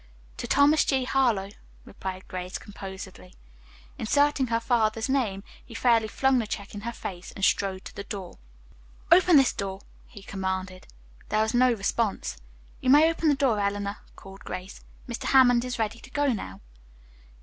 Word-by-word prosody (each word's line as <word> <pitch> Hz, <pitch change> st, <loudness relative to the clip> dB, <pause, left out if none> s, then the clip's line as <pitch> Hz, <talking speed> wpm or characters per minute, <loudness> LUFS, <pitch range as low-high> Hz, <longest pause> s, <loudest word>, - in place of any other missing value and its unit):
"To -, -, -5 dB
Thomas 285 Hz, +2 st, +4 dB
G. 265 Hz, -2 st, +1 dB
Harlowe," 240 Hz, -7 st, +1 dB, 0.3 s
replied 190 Hz, -1 st, -7 dB
Grace 180 Hz, 0 st, -5 dB
composedly. 190 Hz, -, -10 dB, 0.6 s
Inserting 285 Hz, +3 st, +2 dB
her 230 Hz, -1 st, +1 dB
father's 225 Hz, -2 st, +1 dB
name, 230 Hz, -8 st, 0 dB, 0.2 s
he 230 Hz, -, -13 dB
fairly 230 Hz, -2 st, +3 dB
flung 265 Hz, +4 st, +2 dB
the 225 Hz, -, -2 dB
check 200 Hz, -1 st, -6 dB
in 205 Hz, -, -7 dB
her 235 Hz, +3 st, -4 dB
face, 185 Hz, -6 st, -7 dB
and 195 Hz, -, 0 dB
strode 190 Hz, -1 st, 0 dB
to -, -, -9 dB
the 200 Hz, -, -5 dB
door. 195 Hz, -4 st, -8 dB, 0.7 s
"Open 355 Hz, -1 st, +7 dB
this 270 Hz, -2 st, +4 dB
door," 195 Hz, -1 st, -5 dB, 0.3 s
he 200 Hz, -, -13 dB
commanded. 190 Hz, -1 st, -4 dB, 0.4 s
There 215 Hz, +1 st, +2 dB
was 220 Hz, -, -2 dB
no 250 Hz, +1 st, +4 dB
response. 200 Hz, -, -1 dB, 0.4 s
"You 255 Hz, -, -1 dB
may 305 Hz, +4 st, +7 dB
open 330 Hz, -1 st, -1 dB
the 290 Hz, -, +4 dB
door, 260 Hz, -6 st, +1 dB
Eleanor," 200 Hz, 0 st, -2 dB, 0.2 s
called 195 Hz, 0 st, -12 dB
Grace. 185 Hz, +2 st, -7 dB, 0.3 s
"Mr. 235 Hz, -1 st, -5 dB
Hammond 245 Hz, -3 st, +5 dB
is 250 Hz, -1 st, -4 dB
ready 225 Hz, 0 st, -2 dB
to -, -, -14 dB
go 285 Hz, -1 st, +1 dB
now." 95 Hz, -, -7 dB
220 Hz, 165 wpm, -26 LUFS, 195-255 Hz, 0.7 s, Open